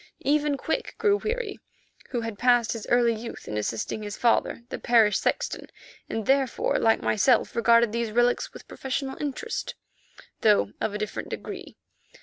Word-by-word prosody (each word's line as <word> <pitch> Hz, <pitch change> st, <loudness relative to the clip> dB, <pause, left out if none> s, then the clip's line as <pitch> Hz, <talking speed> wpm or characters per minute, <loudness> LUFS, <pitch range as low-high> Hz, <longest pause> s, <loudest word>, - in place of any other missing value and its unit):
Even 295 Hz, 0 st, +2 dB
Quick 320 Hz, -, -3 dB
grew 410 Hz, -2 st, +3 dB
weary, 440 Hz, -1 st, -3 dB, 0.5 s
who 240 Hz, -, -2 dB
had 225 Hz, -3 st, -5 dB
passed 245 Hz, -2 st, +3 dB
his 225 Hz, -2 st, -7 dB
early 240 Hz, -1 st, +4 dB
youth 230 Hz, +1 st, -8 dB
in 105 Hz, -, -4 dB
assisting 110 Hz, -, -2 dB
his 205 Hz, -1 st, -6 dB
father, 235 Hz, 0 st, +1 dB
the -, -, -5 dB
parish 225 Hz, -4 st, +4 dB
sexton, -, -, -2 dB, 0.4 s
and 220 Hz, -2 st, -3 dB
therefore, 270 Hz, -2 st, +2 dB
like 225 Hz, 0 st, +3 dB
myself, 230 Hz, +4 st, +2 dB
regarded 235 Hz, -1 st, +4 dB
these 235 Hz, 0 st, -1 dB
relics 240 Hz, +2 st, +1 dB
with -, -, -13 dB
professional 265 Hz, 0 st, -4 dB
interest, 300 Hz, -, -4 dB, 0.6 s
though 205 Hz, -, +3 dB
of 210 Hz, -, -1 dB
a -, -, 0 dB
different 210 Hz, 0 st, -4 dB
degree. -, -, -7 dB
235 Hz, 155 wpm, -26 LUFS, 220-270 Hz, 0.6 s, early